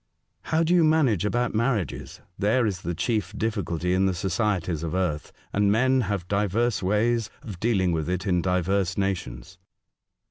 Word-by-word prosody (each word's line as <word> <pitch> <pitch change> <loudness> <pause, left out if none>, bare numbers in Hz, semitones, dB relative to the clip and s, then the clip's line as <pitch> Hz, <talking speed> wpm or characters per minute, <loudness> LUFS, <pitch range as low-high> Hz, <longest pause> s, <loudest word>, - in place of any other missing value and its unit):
" - - -50
How 160 +1 +3
do 165 +2 +2
you 175 -2 +5
manage 145 - +3
about 120 +3 0
marriages? 110 - -2
There 110 +6 +2
is 95 -4 -2
the 85 0 -3
chief 105 0 -1
difficulty 90 -6 -1
in 95 +1 +3
the 95 - 0
societies 90 -3 -1
of 85 +1 -3
earth, 90 -5 -2 0.2
and 100 0 +3
men 130 +4 +3
have 100 -4 -2
divers 105 +4 0
ways 110 +3 +1
of 105 - -8
dealing 95 -5 +1
with 80 -1 -2
it 90 +2 -2
in 90 -3 +2
divers 90 +1 0
nations." 95 -4 -3
100 Hz, 170 wpm, -25 LUFS, 90-115 Hz, 0.2 s, you